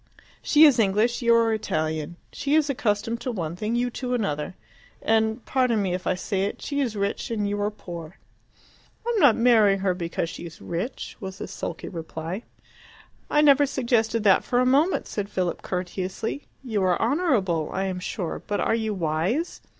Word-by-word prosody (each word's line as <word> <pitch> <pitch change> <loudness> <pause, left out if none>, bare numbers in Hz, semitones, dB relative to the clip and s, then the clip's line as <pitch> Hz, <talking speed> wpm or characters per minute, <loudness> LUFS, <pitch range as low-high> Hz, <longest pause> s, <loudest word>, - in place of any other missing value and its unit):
She 305 0 +5
is 280 -6 +5
English, 220 +4 +2
you 235 -1 +5
are 230 -1 +3
Italian; 155 -6 -2 0.2
she 285 +1 0
is 300 -2 +3
accustomed 230 -1 -1
to 255 - -2
one 170 -7 -3
thing, 215 +5 -2
you 245 +1 0
to 250 0 -2
another. 150 -7 -2 0.4
And 220 +1 +1
pardon 250 -4 +2
me 190 -3 0
if 180 0 -3
I 185 - +2
say 195 +1 -1
it 200 - -4
she 285 -1 -2
is 240 -5 -1
rich 200 0 -2
and 210 -3 -1
you 205 0 -2
are 205 - +1
poor." 175 -5 -9 0.9
"I 475 - +1
am 455 - +1
not 285 - +6
marrying 220 -5 +4
her 190 -2 +2
because 170 -1 -3
she - - -8
is 165 - -13
rich," 180 +10 -5
was 190 -1 -7
the - - -6
sulky - - -6
reply. 165 +2 -5 0.9
"I 295 - +4
never 285 -1 +6
suggested 235 -4 +1
that 195 -3 +5
for 245 - -1
a 255 - +3
moment," 285 +8 +3
said 205 -1 -4
Philip 180 -3 -2
courteously. 185 +7 -4 0.2
"You 220 -6 -1
are 185 -2 +2
honourable, 225 - +1
I 190 - -1
am 185 -1 -3
sure; 180 -1 -4
but 205 - -1
are - - +1
you 220 -2 -1
wise? 180 - -1
210 Hz, 190 wpm, -25 LUFS, 185-245 Hz, 0.9 s, not